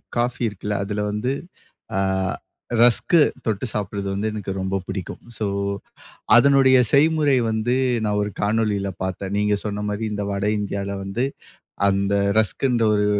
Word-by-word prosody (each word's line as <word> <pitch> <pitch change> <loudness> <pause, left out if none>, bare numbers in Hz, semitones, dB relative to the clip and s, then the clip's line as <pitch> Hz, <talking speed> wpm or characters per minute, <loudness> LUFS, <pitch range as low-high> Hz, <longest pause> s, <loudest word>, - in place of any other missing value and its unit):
Coffee 120 +1 0
இருக்குல 105 +1 -4
அதுல 105 +1 -3
வந்து 105 +5 -1 0.6
அ - - +1 0.8
ரஸ்க் 120 +8 +4 0.3
தொட்டு 110 +1 -1
சாப்பிடுறது 100 -1 -3
வந்து 105 +3 -1
எனக்கு 105 -2 -4
ரொம்ப 95 +1 -2
பிடிக்கும். 95 -1 -5 0.2
சோ 110 - -1 0.9
அதனுடைய 130 +1 +6 0.2
செய்முறை 150 -1 +4
வந்து 110 +3 0 0.3
நான் 105 -1 0
ஒரு 105 - -4
காணொளில 105 -2 +1
பார்த்தேன். 95 +1 -4
நீங்க 105 0 +2
சொன்ன 105 0 -3
மாரி 105 +2 -3
இந்த 105 -1 -2
வட 100 0 -2
இந்தியால 100 -1 -3
வந்து, 100 +6 -2 0.7
அந்த 100 +1 +1 0.2
ரஸ்க்ன்ற 115 +3 +1
ஒரு 105 0 +2
105 Hz, 135 wpm, -22 LUFS, 100-120 Hz, 0.9 s, அதனுடைய